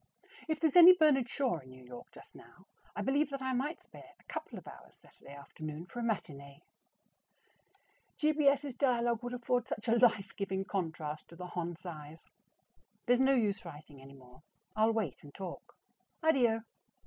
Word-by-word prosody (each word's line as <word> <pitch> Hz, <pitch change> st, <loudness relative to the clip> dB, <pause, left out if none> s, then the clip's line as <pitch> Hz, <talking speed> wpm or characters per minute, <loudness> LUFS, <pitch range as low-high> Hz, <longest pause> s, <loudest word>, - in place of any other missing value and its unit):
If 315 Hz, -1 st, 0 dB
there's 320 Hz, -4 st, +1 dB
any 355 Hz, +1 st, +11 dB
Bernard 295 Hz, -7 st, +3 dB
Shaw 260 Hz, -, -1 dB
in 130 Hz, -2 st, -15 dB
New 130 Hz, 0 st, -14 dB
York 125 Hz, -1 st, -11 dB
just -, -, -16 dB
now, -, -, -17 dB, 0.3 s
I -, -, -3 dB
believe 285 Hz, +2 st, +1 dB
that 275 Hz, -1 st, -5 dB
I 260 Hz, 0 st, -1 dB
might 285 Hz, +6 st, -2 dB
spare -, -, -15 dB
a -, -, -24 dB
couple -, -, -7 dB
of -, -, -11 dB
hours -, -, -13 dB
Saturday 140 Hz, -, -16 dB
afternoon 155 Hz, +3 st, -8 dB
for 240 Hz, -, -8 dB
a -, -, -3 dB
matinee. 140 Hz, -11 st, -4 dB, 1.5 s
G. 305 Hz, -1 st, +3 dB
B. 300 Hz, -2 st, +1 dB
S.'s 280 Hz, -1 st, +2 dB
dialogue 240 Hz, -3 st, +1 dB
would 245 Hz, 0 st, -4 dB
afford 245 Hz, 0 st, -1 dB
such 215 Hz, -2 st, -5 dB
a 230 Hz, +1 st, +3 dB
life 215 Hz, -5 st, +3 dB
giving 195 Hz, -1 st, -2 dB
contrast 160 Hz, -6 st, -4 dB
to 170 Hz, -, -14 dB
the 180 Hz, +1 st, -7 dB
Hon. 175 Hz, -1 st, -4 dB
Cy's. 160 Hz, -3 st, -10 dB, 0.8 s
There's 245 Hz, 0 st, +3 dB
no 270 Hz, +1 st, +4 dB
use 210 Hz, -4 st, 0 dB
writing 150 Hz, -4 st, -11 dB
any 135 Hz, +1 st, -13 dB
more; 125 Hz, +2 st, -17 dB, 0.3 s
I'll 215 Hz, +1 st, +4 dB
wait 215 Hz, -, -3 dB
and 145 Hz, -1 st, -14 dB
talk. 190 Hz, -3 st, -8 dB, 0.5 s
ADDIO. 240 Hz, -8 st, +3 dB
215 Hz, 180 wpm, -32 LUFS, 155-260 Hz, 1.5 s, any